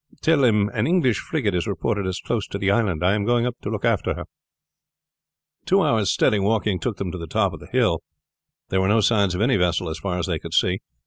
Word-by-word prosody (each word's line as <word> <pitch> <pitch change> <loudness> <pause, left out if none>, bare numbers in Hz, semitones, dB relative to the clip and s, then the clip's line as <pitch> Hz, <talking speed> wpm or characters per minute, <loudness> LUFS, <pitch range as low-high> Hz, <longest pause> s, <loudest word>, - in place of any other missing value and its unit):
Tell 155 -4 +3
him 105 -4 +3
an 110 0 0
English 160 -9 +2
frigate 125 - -2
is 90 -2 -1
reported 100 -2 -2
as 95 0 -3
close 115 -4 -3
to - - -5
the 100 0 +1
island. 100 -6 0
I 95 - +4
am 105 -1 0
going 120 +2 +2
up 125 0 -4
to - - -4
look 110 +1 -3
after 115 -4 +1
her." - - -7 1.4
Two 195 +1 +4
hours' 110 -4 +1
steady 105 - +2
walking 105 -1 0
took 115 -5 -3
them 95 -3 -4
to 90 - -6
the 85 - -7
top - - 0
of - - -8
the - - -14
hill. - - +2 0.7
There 95 - +1
were 95 - +1
no 110 +2 +3
signs 100 -4 +2
of 90 - -2
any 125 +2 +3
vessel 90 -1 0
as 80 0 -5
far 90 -3 -3
as 85 - -1
they 80 -4 -2
could 85 0 -6
see. 90 +1 +2
100 Hz, 245 wpm, -23 LUFS, 90-115 Hz, 1.4 s, I